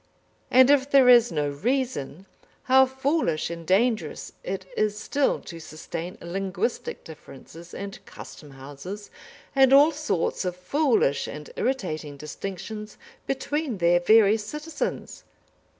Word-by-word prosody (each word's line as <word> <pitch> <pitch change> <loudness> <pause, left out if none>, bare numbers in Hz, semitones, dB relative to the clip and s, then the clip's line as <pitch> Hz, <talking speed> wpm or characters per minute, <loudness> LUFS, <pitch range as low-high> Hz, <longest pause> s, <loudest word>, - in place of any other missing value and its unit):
And 260 +2 +6
if 280 -1 +3
there 275 -3 +6
is 240 -1 +7
no 150 -2 -1
reason, 195 - -2 0.4
how 265 +1 +5
foolish 265 - -1
and 170 -1 -8
dangerous 205 -3 0
it 190 0 -4
is 210 -1 0
still 280 +5 0
to 170 - -9
sustain 165 +2 -7
linguistic 190 +5 -3
differences 165 +2 -13
and 200 0 -8
custom 150 - -11
houses, 145 +10 -9 0.4
and 265 -1 +5
all 285 +4 +7
sorts 285 - -2
of 180 -1 -3
foolish 225 - +1
and 150 0 -8
irritating 155 - -3
distinctions 195 +8 -7 0.3
between 270 -2 -2
their 175 0 +3
various 215 +3 +4
citizens! 300 +8 -5
200 Hz, 120 wpm, -25 LUFS, 165-260 Hz, 0.4 s, is